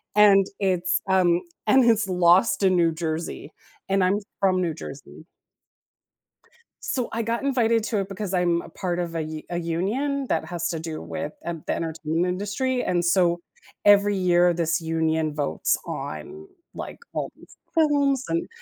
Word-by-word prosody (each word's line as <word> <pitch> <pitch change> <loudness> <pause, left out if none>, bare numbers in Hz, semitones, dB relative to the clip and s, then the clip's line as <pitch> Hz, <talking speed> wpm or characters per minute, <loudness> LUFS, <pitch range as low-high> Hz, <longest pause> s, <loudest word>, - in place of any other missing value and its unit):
and 200 -2 +6
it's, 185 -2 +1
um 180 -2 +3 0.3
and 255 +4 +5
it's 225 -3 +3
lost 185 +3 +4
in 190 -1 +4
New 170 -1 +3
Jersey, 160 -1 -4 0.4
and 195 -1 +2
I'm 190 +3 +2 0.2
from 185 -2 +3
New 170 -3 0
Jersey. 145 0 -10 1.6
So 250 -3 -2
I 230 - -1
got 230 +2 -2
invited 230 -5 +2
to 215 - -1
it 195 -1 -3
because 195 -1 -5
I'm 175 -2 +2
a - - -12
part 180 -2 -3
of 170 -1 -3
a 165 - 0
u 155 0 -6
a 175 - -2
union 220 - -1
that 160 - 0
has 170 +1 -3
to 165 - -3
do 160 -1 -5
with 85 - -5
e - - 0 0.2
the - - +1
entertainment 165 +1 -1
industry 245 +6 -1
and 175 -1 0
so 175 -1 +3 0.5
every 205 0 +6
year 175 -1 +4
this 165 0 0
union 160 -1 0
votes 145 -2 0
on, 385 +1 -6 0.3
like, - - -7 0.2
all - - -2
these - - -18 0.2
films 285 -4 +3
and 340 +1 -1
185 Hz, 165 wpm, -24 LUFS, 165-210 Hz, 1.6 s, and